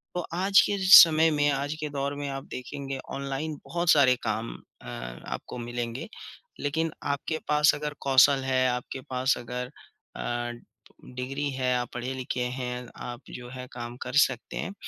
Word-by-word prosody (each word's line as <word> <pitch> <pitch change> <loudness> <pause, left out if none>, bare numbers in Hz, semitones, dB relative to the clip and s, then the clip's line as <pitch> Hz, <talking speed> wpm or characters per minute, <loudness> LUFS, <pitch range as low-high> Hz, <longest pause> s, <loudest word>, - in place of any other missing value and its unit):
तो 175 - 0
आज 195 +3 +4
के 205 - 0
समय 165 -3 +9
में, 145 -1 +2
आज 140 +2 -1
के 150 -1 -3
दौर 140 0 -2
में 145 0 -4
आप 135 0 -5
देखेंगे 135 +1 -6 0.2
ऑनलाइन 140 +3 -3
बहुत 170 0 -2
सारे 130 -4 +6
काम 110 +1 -2 0.3
अ, - - -12
आपको - - -7
मिलेंगे, 120 +1 -4 0.5
लेकिन 160 +3 -1 0.2
आपके 155 +3 -3
पास 150 0 +4
अगर 150 0 -4
कौशल 135 +1 +5
है, 130 -1 +2
आपके 125 +2 -4
पास 130 +1 +1
अगर 125 +1 -5 0.5
अ, 120 0 -3 0.6
डिग्री 135 +3 -3
है, 130 -1 0
आप 120 -1 -3
पढ़े-लिखे 125 +1 -3 0.2
हैं, 125 -1 -4 0.2
आप 120 +1 -7
जो 125 -1 -8
है 125 0 -8
काम 120 0 -6
कर 125 - -6
सकते 125 -3 -8
हैं, 195 - -4
135 Hz, 160 wpm, -27 LUFS, 125-145 Hz, 0.6 s, समय